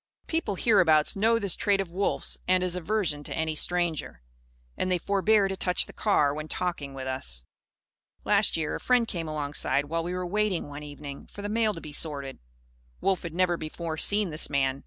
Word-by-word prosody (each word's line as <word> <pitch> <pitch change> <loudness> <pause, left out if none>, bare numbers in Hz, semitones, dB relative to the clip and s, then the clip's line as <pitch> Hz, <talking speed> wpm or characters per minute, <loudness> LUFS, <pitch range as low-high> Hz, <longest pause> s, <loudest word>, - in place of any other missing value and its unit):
People, 320 -11 -1
hereabouts, 175 -8 +4
know 225 +3 +3
this 200 -5 +2
trait 200 -2 +2
of 190 -3 -2
Wolf's 195 +3 -1
and 185 0 +3
his 180 -1 0
aversion 180 -5 -1
to - - -5
any 160 -1 -1
stranger. 170 - -1 0.5
And 185 - -1
they 180 - +3
forbear 200 +3 +3
to 195 - -3
touch 180 -1 +2
the - - -13
car 150 -9 +2
when 155 +1 -5
talking 155 -6 -3
with 130 -1 -5
us. 95 - -4 0.8
Last 205 -3 +3
year, 155 -2 -1
a - - -3
friend 250 -2 +3
came 170 -5 -3
alongside, 145 -1 0
while 165 +3 -1
we 175 +2 -3
were 180 0 -2
waiting, 200 -3 0
one 145 +1 -7
evening, 145 -1 -8
for 205 - -10
the 205 - -3
mail 215 -1 +1
to 165 - -7
be 150 - -8
sorted. 145 -3 -3 0.6
Wolf 190 -2 +1
had 165 -2 -6
never 180 -1 +2
before 160 +1 -4
seen 205 +3 +1
this 155 - -1
man. 135 -1 +1
175 Hz, 200 wpm, -28 LUFS, 150-200 Hz, 0.8 s, hereabouts